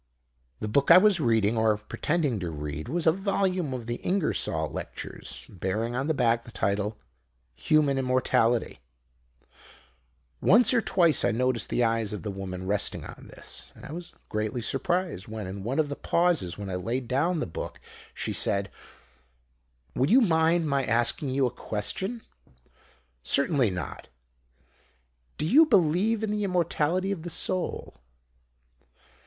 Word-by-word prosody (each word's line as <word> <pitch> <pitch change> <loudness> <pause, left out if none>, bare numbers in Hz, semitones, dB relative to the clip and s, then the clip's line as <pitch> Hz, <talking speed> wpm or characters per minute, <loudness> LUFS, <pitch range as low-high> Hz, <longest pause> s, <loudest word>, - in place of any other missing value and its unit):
"The 105 - -4
book 140 +6 +1
I 170 - +10
was 195 -1 +5
reading, 115 -5 +2
or 110 -1 +2
pretending 140 +3 -1
to 90 -3 -3
read, 75 -1 -5
was 170 0 -1
a 160 - +6
volume 185 -3 -1
of 125 -3 -5
the 120 +1 -3
Ingersoll 185 -3 0
Lectures, - - -7
bearing 105 +5 -3
on 135 +3 -1
the 160 - +1
back 115 -2 +2
the - - -13
title 105 -1 -1 0.6
Human 140 - +2
Immortality. 125 -2 +1 1.6
Once 230 +5 +5
or 235 - +3
twice 170 -7 +3
I 120 - +3
noticed 120 0 0
the 125 - +1
eyes 115 -2 0
of 105 - -6
the 105 - -3
woman 95 -1 -6
resting 100 +2 -1
on - - -11
this, - - -8
but - - -15
I - - -8
was 170 +2 -8
greatly 110 +3 -2
surprised 175 - -1
when, 110 -1 -6
in 95 +1 -6
one 125 +6 -2
of 155 -2 +2
the 145 - -4
pauses 170 - +1
when 100 -2 -6
I - - -2
laid 120 +7 -3
down 160 +8 +1
the - - -1
book, 80 - -7 0.3
she - - -4
said 100 0 0 1.2
"'Would 135 +4 +1
you 255 +5 +6
mind 165 -4 +3
my 140 -2 +1
asking 120 +4 0
you 135 +1 +1
a 125 - 0
question?' 190 - -4 1.0
"'Certainly 140 - +2
not.' 90 -1 -6 1.3
"'Do - - -1
you 300 - +6
believe 205 - +2
in 215 - -1
the 210 0 -1
Immortality 180 0 0
of 190 -5 -3
the 175 - -6
Soul?' 175 - -2
135 Hz, 155 wpm, -27 LUFS, 110-175 Hz, 1.6 s, I